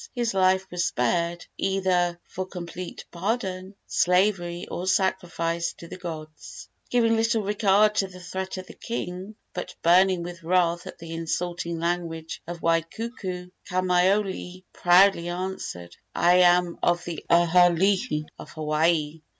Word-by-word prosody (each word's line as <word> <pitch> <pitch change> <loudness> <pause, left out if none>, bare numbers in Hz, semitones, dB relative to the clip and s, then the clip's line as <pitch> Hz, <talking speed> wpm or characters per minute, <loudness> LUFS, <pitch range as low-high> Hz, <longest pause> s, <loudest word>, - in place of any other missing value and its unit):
his 240 -3 0
life 190 0 +3
was 175 -1 -1
spared, 170 +7 0
either 180 -3 +1
for 185 - -4
complete 175 -1 -7
pardon, 190 0 -3
slavery 180 -1 +1
or 180 - -4
sacrifice 170 -4 0
to 170 - -12
the - - -7
gods. 155 -4 -8 0.2
Giving 230 -2 +3
little 225 0 +1
regard 205 +1 +3
to 195 - +2
the 185 -1 -12
threat 190 +1 -5
of 185 - -6
the - - -12
king, 190 -2 -5 0.2
but 180 0 -6
burning 180 +1 +4
with 175 0 -8
wrath 175 0 +1
at - - -9
the 165 -1 -8
insulting 170 +1 -3
language 165 -1 -3
of 170 0 -6
Waikuku, 180 +2 -2 0.2
Kamaiole 185 0 +1
proudly 175 0 +5
answered: 175 - -5 0.2
"I 175 +1 +5
am 175 -1 +4
of 175 0 +1
the 170 -3 -5
aha 175 +1 +6
alii 185 -2 +1
of - - -9
Hawaii. 155 0 0
180 Hz, 135 wpm, -25 LUFS, 170-190 Hz, 0.2 s, aha